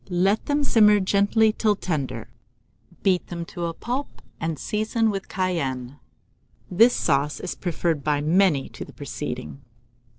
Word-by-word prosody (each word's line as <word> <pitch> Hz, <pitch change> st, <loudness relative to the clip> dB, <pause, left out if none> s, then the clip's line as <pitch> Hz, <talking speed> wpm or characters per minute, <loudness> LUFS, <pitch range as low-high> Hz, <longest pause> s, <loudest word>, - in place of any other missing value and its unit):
Let 190 Hz, +4 st, +1 dB
them 290 Hz, 0 st, +1 dB
simmer 210 Hz, -6 st, +5 dB
gently 205 Hz, +3 st, +3 dB
till 215 Hz, -2 st, +2 dB
tender; 145 Hz, -, -3 dB, 0.8 s
beat 185 Hz, -3 st, +2 dB
them 170 Hz, -1 st, -5 dB
to 175 Hz, -, -3 dB
a 165 Hz, -, -2 dB
pulp, 255 Hz, +8 st, -5 dB, 0.2 s
and 165 Hz, -1 st, -2 dB
season 220 Hz, -, 0 dB
with 195 Hz, -1 st, -5 dB
cayenne. 140 Hz, -8 st, -2 dB, 0.7 s
This 230 Hz, +7 st, +5 dB
sauce 140 Hz, +2 st, +1 dB
is 180 Hz, -, -4 dB
preferred 165 Hz, -4 st, -2 dB
by 150 Hz, -1 st, +1 dB
many 155 Hz, -2 st, +2 dB
to -, -, -8 dB
the -, -, -13 dB
preceding. 75 Hz, -2 st, -6 dB
185 Hz, 140 wpm, -24 LUFS, 150-210 Hz, 0.8 s, simmer